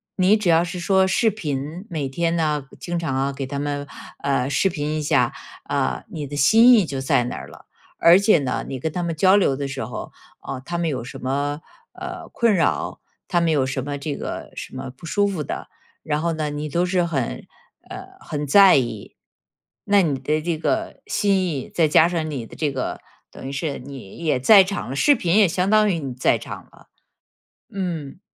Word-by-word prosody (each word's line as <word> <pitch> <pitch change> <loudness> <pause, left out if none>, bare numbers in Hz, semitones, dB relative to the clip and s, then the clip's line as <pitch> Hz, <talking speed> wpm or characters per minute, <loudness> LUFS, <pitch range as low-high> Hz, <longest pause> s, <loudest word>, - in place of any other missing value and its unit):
你 190 +3 +4
只 200 -5 -1
要 165 +1 +5
是 175 +1 -5
说 190 +2 +3
视 220 +4 +2
频， 160 -2 -4
每 150 -6 -3
天 170 +4 0
呢 150 -4 0
经 175 -1 -3
常 160 -6 -2
啊， 135 +1 0
给 135 0 -5
他 140 +2 -4
们， 145 0 -3 0.4
呃， 135 -1 0
视 190 - +2
频 150 -3 -3
一 155 - -3
下， 140 -5 +2 0.3
啊， 140 -2 -1
你 160 -8 -5
的 145 +1 -7
心 225 - +6
意 215 - +6
就 140 -5 -4
在 125 -2 +2
那 125 - -4
儿 - - -8
了。 - - -16 0.3
而 170 +1 +7
且 200 -1 +4
呢， 130 -3 -2
你 130 - -5
跟 160 +5 -2
他 175 +3 -3
们 170 -1 -2
交 185 +5 +5
流 180 -9 +3
的 140 +1 -3
时 135 -1 -4
候， 125 - -7 0.3
啊， 135 - -6
他 170 +5 -4
们 170 -1 0
有 130 -5 -3
什 120 - -9
么， 145 +3 -2 0.3
呃， - - -7
困 230 -3 +2
扰， 165 -5 0 0.3
他 175 - +2
们 170 -1 +2
有 140 -4 +2
什 130 -1 -3
么 145 +1 -4
这 145 0 -4
个 - - -6
什 - - -8
么 130 0 -6
不 130 +6 -13
舒 205 +5 +1
服 185 -6 -3
的， - - -6 0.3
然 150 0 -2
后 170 0 0
呢， 155 -2 -2
你 150 +1 -4
都 175 +4 +1
是 180 -1 +1
很， 145 -8 -2 0.4
呃， - - -8
很 145 -1 -5
在 195 +4 +7
意。 120 -6 -3 0.8
那 200 -1 +6
你 145 -5 -1
的 150 +4 0
这 165 0 -2
个 330 - -2
心 200 -2 +1
意， 140 -6 -3
再 165 -3 +3
加 160 +2 +5
上 165 -3 -2
你 135 -6 -4
的 - - -13
这 150 -3 -1
个 130 -1 -4 0.3
等 135 - -9
于 - - -4
是 140 0 -3
你 130 -6 -10
也 155 -6 0
在 195 - +7
场 195 -7 -4
了， 135 - -4
视 285 - +4
频 180 -6 0
也 205 -4 +6
相 180 +2 0
当 215 0 +4
于 175 - 0
你 135 -3 -5
在 125 - +2
场 - - -8
了。 - - -20 0.9
嗯， 175 -5 -4
155 Hz, 230 characters per minute, -22 LUFS, 140-180 Hz, 0.9 s, 而